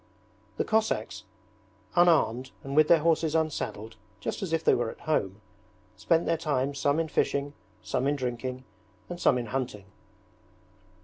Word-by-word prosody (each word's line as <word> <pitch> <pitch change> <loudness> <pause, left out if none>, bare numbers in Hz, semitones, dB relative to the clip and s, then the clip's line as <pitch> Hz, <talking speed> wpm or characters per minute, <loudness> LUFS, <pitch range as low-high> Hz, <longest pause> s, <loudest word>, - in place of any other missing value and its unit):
The - - +1
Cossacks, 220 0 -1 0.7
unarmed 130 -8 +3
and 135 +1 -5
with 155 0 +6
their 165 -1 +5
horses 165 -1 +2
unsaddled 140 -8 -2 0.2
just - - -4
as 190 -4 -3
if 165 -1 0
they - - +5
were 120 -2 0
at - - -11
home, 100 -10 -1 0.5
spent 165 0 +1
their 165 - +1
time 145 -3 -1
some 140 +2 +1
in 165 - 0
fishing, 145 -1 0 0.3
some 130 0 -1
in 145 - +2
drinking, 130 -1 -4 0.5
and 175 0 -6
some 125 - +4
in 120 - -3
hunting. 115 -4 -4
140 Hz, 150 wpm, -28 LUFS, 125-160 Hz, 0.7 s, with